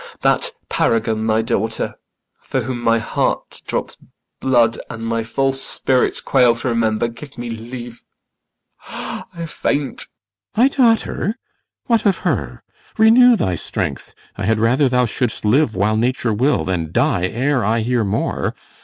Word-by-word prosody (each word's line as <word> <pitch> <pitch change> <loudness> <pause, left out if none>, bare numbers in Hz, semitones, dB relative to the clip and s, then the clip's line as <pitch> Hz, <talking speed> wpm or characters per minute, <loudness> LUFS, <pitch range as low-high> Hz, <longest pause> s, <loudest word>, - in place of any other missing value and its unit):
IACHIMO. - - -15
That - - +2 0.2
paragon, 110 -1 0
thy 110 0 +2
daughter, 110 0 -1 0.5
For - - -2
whom 125 -2 -4
my 115 -1 +3
heart 110 - -2
drops - - -3 0.4
blood 120 -3 +2
and 115 0 -6
my 115 0 0
false 135 +4 0
spirits 130 -1 +1
Quail 125 -3 +4
to 120 +2 -3
remember 115 -1 +1
Give 135 +4 -11
me 120 -1 -5
leave, 120 +1 -8 0.9
I 170 -2 -6
faint. 145 -3 -1 0.5
CYMBELINE. - - -23
My 245 +4 +6
daughter? 230 -4 +1 0.5
What 230 -4 +2
of 195 - +3
her? 70 - -2 0.3
Renew 235 +3 +7
thy 95 - 0
strength; 85 - -4 0.2
I 100 - -4
had 110 +2 +2
rather 130 +5 +3
thou 125 0 +3
shouldst 115 -1 -2
live 120 +2 +3
while 105 +3 +1
nature 120 0 0
will 130 +8 +1
Than 85 -4 -2
die 115 - +1
ere 130 +4 0
I 110 +3 +1
hear 120 0 +1
more. 105 +2 -1
120 Hz, 150 wpm, -19 LUFS, 110-135 Hz, 0.9 s, Renew